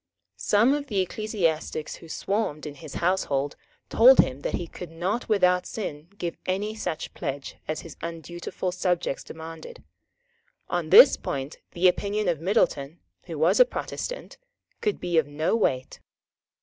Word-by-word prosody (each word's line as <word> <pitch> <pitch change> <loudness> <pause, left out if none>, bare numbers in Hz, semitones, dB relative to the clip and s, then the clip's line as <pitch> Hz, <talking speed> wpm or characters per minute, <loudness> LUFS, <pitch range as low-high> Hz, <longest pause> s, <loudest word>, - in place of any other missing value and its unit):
Some 225 +6 +3
of 290 -1 -2
the 205 -6 -1
ecclesiastics 175 -6 -2
who 165 - -14
swarmed 195 -6 -2
in 150 - -5
his 150 -1 -10
household 145 -6 0 0.3
told 255 +3 +7
him 130 +1 +3
that - - -2
he 175 - -3
could 175 0 -9
not 185 +9 -2
without 180 -3 +3
sin 155 -8 -5
give 170 -3 -4
any 200 +3 -1
such 165 -7 -4
pledge 135 0 -5
as 155 - -2
his 165 - -11
undutiful 170 +2 -4
subjects 180 -5 -1
demanded. 160 0 -9 0.9
On - - -1
this 480 +4 +9
point 135 +2 -5
the 180 +2 +4
opinion 205 +3 0
of 165 -3 0
Middleton, 165 -6 +1 0.3
who - - -5
was - - +3
a - - +11
Protestant, - - -5 0.4
could 425 -3 0
be 175 -2 +2
of 150 - -1
no 155 +7 0
weight. 130 - 0
175 Hz, 150 wpm, -26 LUFS, 155-205 Hz, 0.9 s, a